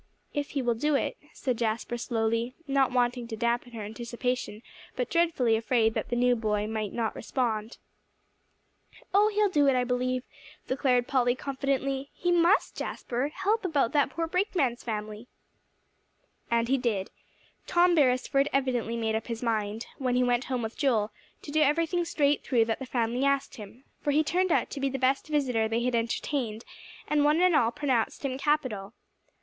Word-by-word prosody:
"If 290 Hz, -1 st, -2 dB
he 270 Hz, -, 0 dB
will 240 Hz, -1 st, +2 dB
do 295 Hz, +6 st, 0 dB
it," -, -, 0 dB, 0.2 s
said 250 Hz, -4 st, -3 dB
Jasper 230 Hz, +1 st, -1 dB
slowly, 230 Hz, 0 st, -1 dB
not 275 Hz, -2 st, +2 dB
wanting 245 Hz, -1 st, 0 dB
to 225 Hz, -, -5 dB
dampen 235 Hz, +1 st, -1 dB
her 220 Hz, -2 st, -5 dB
anticipation, 235 Hz, +1 st, -4 dB, 0.3 s
but 250 Hz, -, -2 dB
dreadfully 325 Hz, -9 st, +2 dB
afraid 225 Hz, 0 st, +2 dB
that -, -, -3 dB
the 240 Hz, -, 0 dB
new 245 Hz, 0 st, +3 dB
boy 210 Hz, -2 st, -1 dB
might 215 Hz, -2 st, -3 dB
not 225 Hz, -2 st, -2 dB
respond. 225 Hz, -3 st, -2 dB, 1.4 s
"Oh, 410 Hz, +2 st, +5 dB
he'll 420 Hz, 0 st, +2 dB
do 295 Hz, -7 st, +3 dB
it, 270 Hz, -, +4 dB
I 250 Hz, -, +2 dB
do 245 Hz, -, -6 dB
believe," 250 Hz, 0 st, 0 dB, 0.4 s
declared 255 Hz, -2 st, +1 dB
Polly 245 Hz, -2 st, +2 dB
confidently; 275 Hz, 0 st, -2 dB
"he 350 Hz, -, 0 dB
must, 350 Hz, +3 st, +3 dB
Jasper, 250 Hz, +3 st, -3 dB
help 390 Hz, +8 st, -1 dB
about 290 Hz, -10 st, +1 dB
that 285 Hz, -2 st, +2 dB
poor 330 Hz, +5 st, -2 dB
brakeman's 330 Hz, -, 0 dB
family." 215 Hz, 0 st, -5 dB, 1.2 s
And 235 Hz, 0 st, +2 dB
he 270 Hz, +2 st, +2 dB
did. 210 Hz, -6 st, -1 dB, 0.6 s
Tom 350 Hz, 0 st, +4 dB
Beresford 275 Hz, -1 st, +2 dB
evidently 250 Hz, -4 st, 0 dB
made 225 Hz, -1 st, -1 dB
up 220 Hz, 0 st, -2 dB
his 230 Hz, 0 st, -4 dB
mind, 220 Hz, -1 st, -1 dB
when 255 Hz, -2 st, 0 dB
he 250 Hz, -, +3 dB
went 245 Hz, 0 st, +1 dB
home 255 Hz, -3 st, -2 dB
with 220 Hz, +1 st, -4 dB
Joel, 225 Hz, -7 st, +2 dB, 0.3 s
to 290 Hz, -, -7 dB
do 310 Hz, +1 st, +2 dB
everything 335 Hz, +4 st, +2 dB
straight 290 Hz, -3 st, +1 dB
through 235 Hz, -4 st, +2 dB
that 225 Hz, 0 st, -2 dB
the 265 Hz, -, -6 dB
family 240 Hz, +1 st, 0 dB
asked 275 Hz, 0 st, 0 dB
him, 220 Hz, +4 st, -11 dB, 0.2 s
for -, -, -2 dB
he 300 Hz, +2 st, +3 dB
turned 365 Hz, +3 st, +1 dB
out -, -, +1 dB
to 285 Hz, -, -5 dB
be 275 Hz, 0 st, 0 dB
the 270 Hz, -, -3 dB
best 265 Hz, +3 st, +1 dB
visitor 260 Hz, -7 st, +1 dB
they 230 Hz, +2 st, -1 dB
had 250 Hz, 0 st, 0 dB
entertained, 230 Hz, 0 st, -2 dB, 0.4 s
and 295 Hz, -1 st, +2 dB
one 300 Hz, +2 st, +4 dB
and 365 Hz, -2 st, +4 dB
all 230 Hz, -, +4 dB
pronounced 255 Hz, 0 st, -1 dB
him 260 Hz, -1 st, -2 dB
capital. 255 Hz, -9 st, -1 dB
250 Hz, 180 wpm, -28 LUFS, 230-285 Hz, 1.4 s, Oh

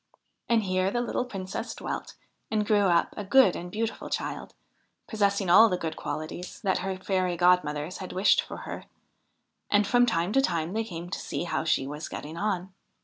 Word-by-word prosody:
And 230 Hz, -2 st, +3 dB
here 185 Hz, 0 st, +1 dB
the 240 Hz, -, -1 dB
little 245 Hz, +1 st, -1 dB
Princess 195 Hz, -6 st, -5 dB
dwelt -, -, -5 dB, 0.3 s
and 215 Hz, -1 st, 0 dB
grew 205 Hz, -2 st, +3 dB
up 170 Hz, -2 st, +2 dB
a 205 Hz, -, -4 dB
good 200 Hz, -1 st, +5 dB
and 175 Hz, -, -6 dB
beautiful 225 Hz, +2 st, -3 dB
child, -, -, -4 dB, 0.5 s
possessing 200 Hz, -3 st, 0 dB
all 215 Hz, +6 st, +8 dB
the 180 Hz, -, 0 dB
good 160 Hz, -2 st, -4 dB
qualities 155 Hz, +3 st, -6 dB
that 195 Hz, -4 st, +1 dB
her 190 Hz, 0 st, -2 dB
fairy 185 Hz, -2 st, -1 dB
godmothers 175 Hz, -2 st, +2 dB
had 185 Hz, -, -6 dB
wished 190 Hz, +3 st, +4 dB
for -, -, -8 dB
her; -, -, -6 dB, 0.8 s
and 205 Hz, 0 st, +4 dB
from 245 Hz, +4 st, +4 dB
time 180 Hz, -2 st, 0 dB
to 270 Hz, -, +5 dB
time 170 Hz, -7 st, -1 dB
they 225 Hz, +1 st, 0 dB
came 175 Hz, -4 st, -7 dB
to -, -, -3 dB
see -, -, -4 dB
how 170 Hz, -, -2 dB
she 145 Hz, -4 st, +2 dB
was 150 Hz, +3 st, -6 dB
getting 155 Hz, +2 st, -7 dB
on. 190 Hz, -1 st, -2 dB
190 Hz, 190 wpm, -27 LUFS, 175-210 Hz, 0.8 s, all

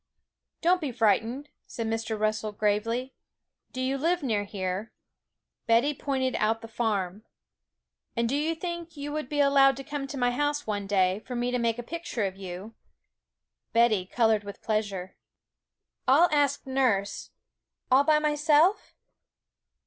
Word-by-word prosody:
'Don't 360 Hz, +2 st, +3 dB
be 290 Hz, -4 st, -2 dB
frightened,' 235 Hz, +5 st, +1 dB, 0.2 s
said 230 Hz, -, -4 dB
Mr. 225 Hz, -1 st, -2 dB
Russell 215 Hz, 0 st, 0 dB
gravely. 225 Hz, +5 st, -1 dB, 0.6 s
'Do 255 Hz, -, -7 dB
you 265 Hz, +1 st, -1 dB
live 340 Hz, +3 st, +1 dB
near 215 Hz, -6 st, 0 dB
here?' 195 Hz, +1 st, -4 dB, 0.8 s
Betty 235 Hz, +6 st, +4 dB
pointed 265 Hz, -2 st, -1 dB
out 220 Hz, +1 st, +1 dB
the 225 Hz, -, -8 dB
farm. 210 Hz, -4 st, -2 dB, 0.9 s
'And 235 Hz, 0 st, +2 dB
do 260 Hz, -, 0 dB
you 310 Hz, +3 st, 0 dB
think 340 Hz, -1 st, -6 dB
you 290 Hz, +1 st, -5 dB
would 305 Hz, -3 st, -4 dB
be 295 Hz, -, -2 dB
allowed 275 Hz, -1 st, +5 dB
to 275 Hz, -, -6 dB
come 285 Hz, -1 st, -4 dB
to 275 Hz, -, -6 dB
my 245 Hz, -1 st, +2 dB
house 290 Hz, +3 st, -1 dB
one 205 Hz, -2 st, -3 dB
day, 190 Hz, -1 st, +2 dB
for 250 Hz, +3 st, -7 dB
me 245 Hz, +1 st, -1 dB
to 250 Hz, -, 0 dB
make 230 Hz, -1 st, 0 dB
a 240 Hz, -, -5 dB
picture 315 Hz, -7 st, -3 dB
of 190 Hz, -1 st, -3 dB
you?' 190 Hz, +3 st, -8 dB, 1.0 s
Betty 225 Hz, -5 st, +3 dB
coloured 220 Hz, -1 st, +2 dB
with 200 Hz, 0 st, -10 dB
pleasure. 205 Hz, -4 st, -2 dB, 0.9 s
'I'll 305 Hz, +7 st, +6 dB
ask 285 Hz, -1 st, +1 dB
nurse. 250 Hz, -7 st, 0 dB, 0.6 s
All 265 Hz, +2 st, +6 dB
by 305 Hz, 0 st, +4 dB
myself?' 300 Hz, +5 st, +2 dB
245 Hz, 150 wpm, -27 LUFS, 215-285 Hz, 1.0 s, I'll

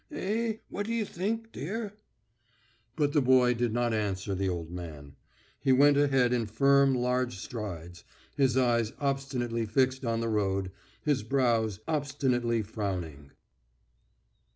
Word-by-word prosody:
"Eh! 220 Hz, +3 st, -1 dB
What 205 Hz, +1 st, -4 dB
do 230 Hz, -, -2 dB
you 225 Hz, -2 st, 0 dB
think, 225 Hz, +5 st, -3 dB
dear?" 205 Hz, +6 st, -4 dB, 1.0 s
But 145 Hz, -2 st, +1 dB
the 150 Hz, -, +4 dB
boy 125 Hz, -1 st, +5 dB
did 120 Hz, -1 st, -1 dB
not 120 Hz, 0 st, 0 dB
answer 100 Hz, -2 st, -2 dB
the 95 Hz, 0 st, -1 dB
old 85 Hz, -2 st, -4 dB
man. 75 Hz, -5 st, -8 dB, 0.4 s
He 135 Hz, -, +2 dB
went 140 Hz, +2 st, +6 dB
ahead 135 Hz, -4 st, +3 dB
in 115 Hz, -3 st, 0 dB
firm 140 Hz, +4 st, +4 dB
large 125 Hz, -1 st, 0 dB
strides, 90 Hz, -6 st, -7 dB, 0.3 s
his 130 Hz, -3 st, +2 dB
eyes 120 Hz, -3 st, +2 dB
obstinately 130 Hz, -5 st, -1 dB
fixed 130 Hz, +4 st, +1 dB
on 115 Hz, -2 st, 0 dB
the 115 Hz, -, -1 dB
road, 95 Hz, -3 st, 0 dB, 0.3 s
his 145 Hz, -5 st, +1 dB
brows 115 Hz, -4 st, +1 dB
obstinately 135 Hz, -6 st, 0 dB
frowning. 90 Hz, -9 st, -5 dB
120 Hz, 135 wpm, -29 LUFS, 105-140 Hz, 1.0 s, went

